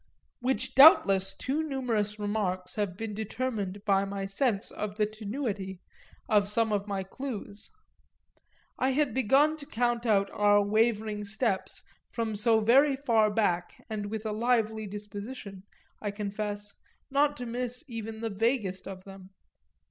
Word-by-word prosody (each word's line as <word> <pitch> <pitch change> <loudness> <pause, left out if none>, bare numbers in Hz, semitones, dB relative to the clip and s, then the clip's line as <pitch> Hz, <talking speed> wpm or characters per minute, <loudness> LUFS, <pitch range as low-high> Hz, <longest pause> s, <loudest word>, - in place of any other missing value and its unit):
Which 260 +2 -1
doubtless 195 - +7
too 280 +4 -1
numerous 240 -8 -1
remarks 205 -3 -2
have 205 -4 -2
been 225 -1 -4
determined 210 -2 -3
by 195 -2 +3
my 195 0 -4
sense 200 +1 0
of 210 -1 -5
the 210 - +3
tenuity 210 -3 -4 0.5
of 205 -4 +3
some 220 0 +1
of 200 0 -1
my 195 -2 -2
clues: 210 -1 -7 1.1
I 260 +1 +2
had 290 0 +1
begun 275 +5 +3
to 285 -2 -7
count 240 0 0
our 205 0 +3
wavering 215 0 +1
steps 205 -1 -2 0.3
from 225 -2 -2
so 220 +1 +3
very 270 +6 +5
far 230 -6 +3
back, 180 -5 -1
and 210 -2 -3
with 220 +1 -5
a 215 - -1
lively 220 -1 0
disposition, 205 0 -8 0.4
I 210 - -2
confess, 205 0 -4 0.4
not 290 +1 +2
to 245 - -5
miss 245 +3 -3
even 225 -2 -6
the 225 -1 -2
vaguest 205 -2 -1
of 190 -1 -8
them. 195 -1 -12
215 Hz, 140 wpm, -29 LUFS, 200-240 Hz, 1.1 s, doubtless